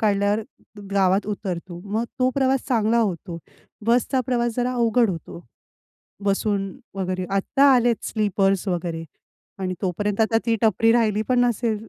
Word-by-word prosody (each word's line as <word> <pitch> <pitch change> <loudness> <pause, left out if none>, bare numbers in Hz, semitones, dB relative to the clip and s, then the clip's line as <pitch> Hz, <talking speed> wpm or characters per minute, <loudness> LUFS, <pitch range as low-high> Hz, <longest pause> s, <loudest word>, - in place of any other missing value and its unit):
काढल्यावर 205 0 +2 0.5
गावात 195 +1 +2
उतरतो. 185 -4 -5
मग 215 +3 -1
तो 255 0 +3
प्रवास 265 -1 +1
चांगला 230 -1 +2
होतो. 180 -5 -2 0.5
बसचा 245 +3 +2
प्रवास 240 -2 0
जरा 245 +1 0
अवघड 235 -2 +2
होतो. 170 0 -8 0.8
बसून 200 -1 0 0.2
वगैरे. 185 -1 -2
आता 195 +8 +2
आलेत 240 -2 +3
स्लीपर्स 195 -2 +1
वगैरे 170 -2 -3 0.6
आणि 185 -1 -2
तोपर्यंत 200 +3 -1
आता 225 +1 +3
ती 230 -1 +2
टपरी 225 +1 +4
राहिली 215 -3 +2
पण 250 -1 +3
नसेल. 230 -2 0
210 Hz, 135 wpm, -23 LUFS, 195-235 Hz, 0.8 s, टपरी